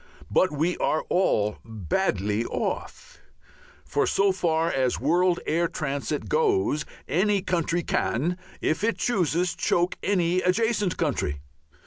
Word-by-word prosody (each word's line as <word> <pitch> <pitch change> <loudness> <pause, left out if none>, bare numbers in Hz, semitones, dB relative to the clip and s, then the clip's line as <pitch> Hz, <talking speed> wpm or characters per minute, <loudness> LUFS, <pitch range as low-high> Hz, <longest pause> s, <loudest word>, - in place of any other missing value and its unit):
But 185 - +3
we 160 +4 0
are 155 - 0
all 105 - +1
badly 105 - -1
off. 485 - -4 0.7
So 200 - +2
far 170 -3 0
as 130 -2 0
world 175 +5 +2
air 170 +2 +1
transit 145 -1 -3
goes 395 - +1 0.2
any 195 +6 +1
country 170 -2 0
can, 170 +9 -1 0.2
if 155 +5 0
it 230 +1 +1
chooses, 180 -5 +1
choke 175 +1 0
any 180 -2 +1
adjacent 210 0 +1
country. 95 - -1
175 Hz, 115 wpm, -26 LUFS, 150-190 Hz, 0.7 s, But